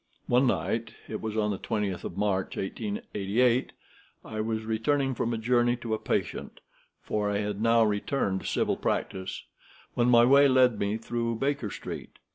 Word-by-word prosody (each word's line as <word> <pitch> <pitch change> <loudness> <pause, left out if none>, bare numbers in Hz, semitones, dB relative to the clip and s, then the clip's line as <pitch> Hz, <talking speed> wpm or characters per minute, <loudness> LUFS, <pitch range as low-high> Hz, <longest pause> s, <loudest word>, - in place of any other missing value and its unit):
One 125 +2 +3
night—it 115 -1 -2
was 110 -1 -3
on 105 -1 +1
the 100 - -3
20th 100 -5 -2
of 85 - -6
March, 100 -2 0
1888—I 120 - -2
was 110 0 -2
returning 130 +5 0
from 115 -1 -1
a 115 - -1
journey 120 +1 +2
to 120 -2 -4
a 110 - -1
patient - - -3 0.4
(for 105 -1 -1
I 100 - 0
had 105 0 -3
now 115 0 +5
returned 105 -1 0
to - - -6
civil - - 0
practice), 95 -1 -2 0.5
when 120 0 +2
my 120 -1 +7
way 140 +3 +7
led 130 -4 +4
me 100 +2 0
through 115 0 -2
Baker 135 -2 -1
Street. - - -7
115 Hz, 160 wpm, -28 LUFS, 105-125 Hz, 0.5 s, my